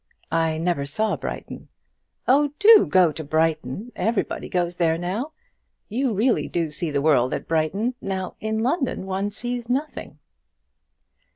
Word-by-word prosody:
"I 165 -1 +1
never 160 -4 -1
saw 215 +9 0
Brighton." - - -7 0.6
"Oh, 285 +2 +3
do 430 0 +7
go 185 -4 +5
to 160 - -7
Brighton. 160 - -1
Everybody 225 -2 -1
goes 175 -1 -1
there 165 -2 +2
now; 195 - -3 0.6
you 250 +4 0
really 235 +5 +2
do 165 -3 -2
see 155 +2 -3
the 140 -1 -1
world 130 -5 +3
at - - -6
Brighton. 175 +10 0
Now, 190 -1 -3
in 220 0 -2
London 265 - -1
one 195 +1 -2
sees 240 +2 -5
nothing." 270 - -3
190 Hz, 145 wpm, -23 LUFS, 160-240 Hz, 0.6 s, do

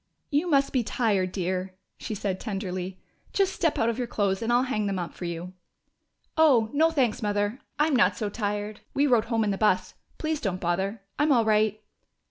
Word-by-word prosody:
"You 305 +5 +1
must 275 -3 +3
be 255 - +3
tired, 205 -6 0
dear," 185 0 -2 0.2
she 215 - -4
said 190 -2 -2
tenderly. 190 -3 -4 0.3
"Just 390 -1 +2
step 325 -4 0
out 225 - +2
of 235 +1 -1
your 245 - -1
clothes, 200 -3 0
and 230 +1 0
I'll 245 +1 +4
hang 215 -6 -1
them 195 -1 -1
up 175 -2 -4
for 180 - -7
you." 170 +1 -5 0.8
"Oh, 265 -9 +4
no, 315 +3 +4
thanks, 255 -8 +1
Mother. 205 +3 0 0.2
I'm 300 -1 +3
not 185 -5 +3
so 210 - -1
tired. 205 0 -3 0.2
We 280 - +3
rode 240 -5 +3
home 230 -1 +1
in 210 - +1
the 195 - -3
bus.... 210 -4 +2 0.2
Please 310 -1 -2
don't 185 -4 -2
bother. 190 +4 -1 0.2
I'm 295 +1 +3
all 235 -4 +4
right." 215 0 +2
215 Hz, 200 wpm, -27 LUFS, 190-255 Hz, 0.8 s, I'll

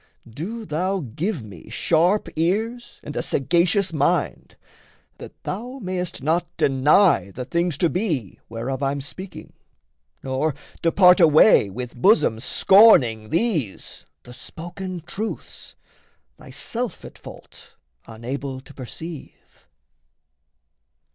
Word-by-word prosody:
Do 195 - -6
thou 185 +5 -1
Give 150 - -4
me 95 -7 -12
sharp 175 +5 +1
ears 220 +9 -2
and 150 - -8
a - - -1
sagacious 175 - +1
mind, 145 -2 -1 0.6
That - - -12
thou 245 +7 -5
mayst 185 - -4
not 165 +3 +1
deny 140 - +3
the 125 +6 -7
things 170 +2 -1
to 170 - +2
be 160 - -2
Whereof 120 +4 -4
I'm 140 +1 -1
speaking, 185 +7 -10 0.7
nor 135 +2 -1 0.3
depart 180 +2 +5
away 155 - +6
With 125 +4 -7
bosom 125 - +3
scorning 125 - +5
these 165 - -2 0.2
the 125 - -12
spoken 175 +6 -8
truths, 195 +7 -6 0.6
Thyself 240 0 -5
at - - -12
fault - - -14 0.3
unable 130 +4 -6
to 145 - -16
perceive. 150 +5 -10
160 Hz, 110 wpm, -22 LUFS, 130-190 Hz, 0.7 s, away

